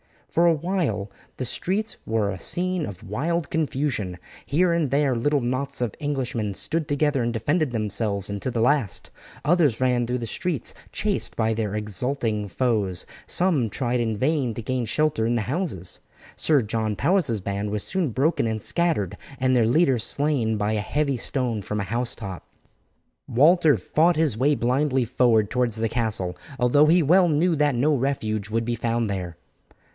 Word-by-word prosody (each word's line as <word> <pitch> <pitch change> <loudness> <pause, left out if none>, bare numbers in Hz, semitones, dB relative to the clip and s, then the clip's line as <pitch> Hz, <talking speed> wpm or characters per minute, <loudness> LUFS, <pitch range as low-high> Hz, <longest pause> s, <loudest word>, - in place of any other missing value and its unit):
For 170 +1 +3
a 170 - +5
while 150 - -2 0.3
the - - -3
streets 200 - -2
were 110 -3 +1
a 95 - -6
scene 180 - 0
of 95 -2 -9
wild 160 - -2
confusion; 135 - -1 0.3
here 175 +5 +2
and 165 -4 +1
there 140 0 +2
little 145 +4 +1
knots 130 +3 -2
of 120 -4 -1
Englishmen 130 -8 -2
stood 160 - -1
together 145 -1 +1
and 120 0 0
defended 145 +7 +1
themselves 105 -3 -1
until 100 +5 -3
the 115 - 0
last, 125 -4 0 0.3
others 150 -7 +3
ran 125 -2 +2
through 125 +1 -1
the 120 - -4
streets 160 +6 -2 0.2
chased 210 -2 -2
by 110 -1 +1
their 105 -2 -2
exulting 105 +1 -2
foes, 105 -6 -1 0.2
some 165 -11 +2
tried 125 +2 -1
in 110 -2 -1
vain 135 -2 +1
to 115 - -4
gain 125 +1 -2
shelter 150 -3 +1
in 120 - +1
the 115 - +1
houses. 120 - -3 0.4
Sir 150 -4 +3
John 110 -1 -2
Powis's 145 - +1
band 100 +2 -3
was 105 0 -2
soon 185 -5 -1
broken 130 +2 +1
and 110 -1 -2
scattered, 160 - 0 0.2
and 130 0 +1
their 120 -3 +4
leader 135 0 +3
slain 120 -3 0
by 105 +1 0
a 110 - 0
heavy 140 +5 0
stone 120 -3 -2
from 105 +2 -3
a 100 - -6
housetop. 115 - -3 0.8
Walter 155 +4 +5
fought 165 +8 +2
his 155 -8 +1
way 145 +5 +3
blindly 130 +1 +1
forward 115 -3 +2
towards 125 -2 +1
the 115 0 0
castle 105 -7 -1 0.2
although 130 +4 +4
he 170 +2 +5
well 175 +5 +5
knew 165 +2 +2
that 145 -2 +2
no 145 +6 +2
refuge 110 -6 -1
would 115 +1 -1
be 120 0 -1
found 115 0 -1
there. 90 -3 -4
125 Hz, 170 wpm, -24 LUFS, 110-150 Hz, 0.8 s, a